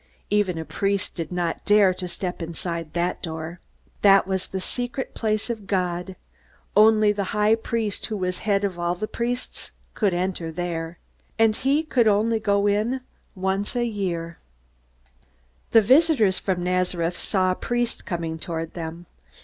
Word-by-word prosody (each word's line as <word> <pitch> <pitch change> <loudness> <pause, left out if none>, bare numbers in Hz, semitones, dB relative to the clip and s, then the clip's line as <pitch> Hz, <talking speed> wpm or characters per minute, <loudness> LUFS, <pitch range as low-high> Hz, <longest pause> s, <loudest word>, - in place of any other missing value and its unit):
Even 205 -4 +2
a 160 - -4
priest 195 +6 -1
did 165 -2 -5
not 175 -2 -2
dare 205 -2 +5
to 180 0 -5
step 180 0 -4
inside 165 -1 -4
that 175 +1 -1
door. 160 0 -5 0.4
That 195 -1 +6
was 190 0 -2
the 190 - -4
secret 245 +7 -3
place 215 -1 -1
of 220 -5 -5
God. 180 -1 -1 0.6
Only 215 0 +6
the 200 -1 -2
high 210 +1 +4
priest, 225 -2 -1
who 215 - -3
was 185 -1 -2
head 205 -2 +1
of 185 -3 -2
all 175 0 0
the 215 +4 -3
priests, 240 +3 -4 0.2
could 205 -3 +1
enter 175 -2 -2
there. 165 0 -4 0.4
And 225 -1 +4
he 280 +6 +1
could 250 -7 +2
go 210 -1 +2
in 205 0 +4
only 260 +3 -1 0.4
once 190 +4 -1
a 240 -1 +1
year. 175 -7 -3 1.3
The 225 - +7
visitors 255 - +4
from 185 -3 -1
Nazareth 180 -1 0
saw 185 -2 +1
a - - 0
priest 240 +2 -2
coming 165 -3 -3
toward 165 -2 -3
them. 170 0 -6
190 Hz, 155 wpm, -24 LUFS, 175-215 Hz, 1.3 s, The